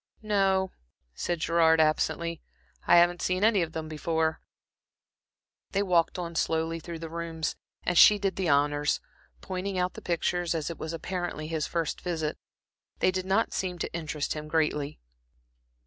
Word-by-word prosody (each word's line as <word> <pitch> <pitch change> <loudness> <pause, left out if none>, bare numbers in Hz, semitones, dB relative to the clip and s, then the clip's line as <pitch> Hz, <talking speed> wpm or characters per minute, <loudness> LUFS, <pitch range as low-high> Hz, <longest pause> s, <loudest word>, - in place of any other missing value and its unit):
"No," 195 -3 +2 0.4
said 170 - -2
Gerard, 160 0 +4
absently. 165 +1 +1 0.5
"I - - +7
haven't 175 0 +4
seen 185 +2 0
any 215 -3 +4
of 165 -1 -3
them 160 -1 -4
before." 160 +1 -1 1.3
They 200 0 +2
walked 175 -3 +2
on 170 -1 -4
slowly 165 0 0
through 170 +1 -7
the 165 0 -6
rooms, 165 -1 -3 0.3
and 180 - 0
she 210 +4 +8
did 195 -1 -1
the 185 -3 -1
honors, 145 +1 +2 0.4
pointing 190 +1 -3
out 180 0 0
the - - -9
pictures, 175 0 0
as 160 0 -2
it 165 - -9
was 160 - -4
apparently 175 -2 -4
his 160 -2 -1
first 165 -2 -2
visit. 160 -4 -2 0.6
They - - +3
did 185 0 -3
not 195 +4 +2
seem 180 -2 -2
to - - -4
interest 155 -3 -2
him 150 0 -6
greatly. 150 -2 0
170 Hz, 160 wpm, -28 LUFS, 160-185 Hz, 1.3 s, she